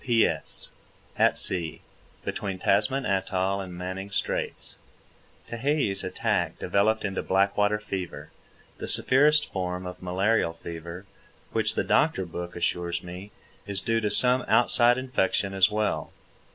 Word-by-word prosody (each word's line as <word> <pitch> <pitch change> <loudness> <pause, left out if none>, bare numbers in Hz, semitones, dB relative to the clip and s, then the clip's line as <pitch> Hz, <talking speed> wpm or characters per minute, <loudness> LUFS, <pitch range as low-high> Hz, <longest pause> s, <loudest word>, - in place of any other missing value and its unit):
P.S. 115 -3 0 0.5
At - - +3
sea, 85 -4 -1 0.4
between 100 -2 -3
Tasman 110 +8 +1
atoll 95 -1 -1
and 95 -1 -8
Manning 95 +2 -5
Straits. 100 - -4 0.7
Tehei's 120 -5 -1
attack 95 0 -1
developed 110 +2 +1
into 95 -1 -2
black 100 +1 +1
water 105 +1 +2
fever—the 95 -4 -9
severest 150 +3 +3
form 90 -1 -3
of 90 0 -8
malarial 90 0 +1
fever, 85 +2 -8 0.5
which, - - +1
the - - 0
doctor 95 - +2
book 85 0 -7
assures 85 0 -2
me, 90 +3 -9 0.4
is 100 -1 0
due 115 -1 0
to 105 - 0
some 125 +2 +7
outside 120 0 +4
infection 100 -6 -1
as 95 0 +4
well. 105 0 -2
95 Hz, 125 wpm, -26 LUFS, 90-110 Hz, 0.7 s, some